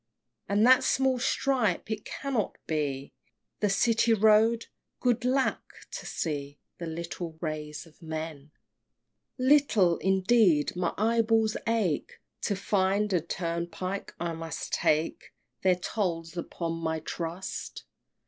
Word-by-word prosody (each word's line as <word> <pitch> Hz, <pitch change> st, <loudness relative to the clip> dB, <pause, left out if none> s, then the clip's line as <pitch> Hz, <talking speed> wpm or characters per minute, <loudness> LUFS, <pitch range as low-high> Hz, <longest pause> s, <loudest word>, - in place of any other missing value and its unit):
And 205 Hz, +2 st, +4 dB
that 260 Hz, +1 st, +7 dB
small 260 Hz, -1 st, +2 dB
stripe? 240 Hz, -6 st, +1 dB
it 215 Hz, -1 st, -3 dB
cannot 265 Hz, -8 st, -2 dB
be 140 Hz, -3 st, -2 dB, 0.5 s
The 210 Hz, -, +2 dB
City 225 Hz, +3 st, +3 dB
Road! 220 Hz, +2 st, +4 dB, 0.3 s
Good 245 Hz, -1 st, +1 dB
lack! 260 Hz, +2 st, +1 dB, 0.3 s
to -, -, -6 dB
see 145 Hz, -3 st, -3 dB, 0.2 s
The 170 Hz, -, -4 dB
little 165 Hz, +1 st, -5 dB
ways 155 Hz, -1 st, -5 dB
of 165 Hz, +1 st, -21 dB
men! 155 Hz, -2 st, -6 dB, 0.9 s
VII. 255 Hz, -, -2 dB
Little, 230 Hz, -, +4 dB
indeed! 190 Hz, -5 st, +3 dB
my 180 Hz, -1 st, 0 dB
eyeballs 225 Hz, 0 st, +2 dB
ache 215 Hz, -9 st, 0 dB, 0.2 s
To 200 Hz, -, 0 dB
find 200 Hz, +1 st, +1 dB
a 175 Hz, -, +3 dB
turnpike. 170 Hz, +3 st, -4 dB
I 170 Hz, -1 st, -2 dB
must 165 Hz, -1 st, -6 dB
take 155 Hz, +2 st, +1 dB, 0.3 s
Their 185 Hz, -1 st, +4 dB
tolls 175 Hz, -3 st, -3 dB
upon 165 Hz, -1 st, -3 dB
my 160 Hz, -1 st, -1 dB
trust! 170 Hz, +3 st, -5 dB
185 Hz, 120 wpm, -28 LUFS, 165-225 Hz, 0.9 s, that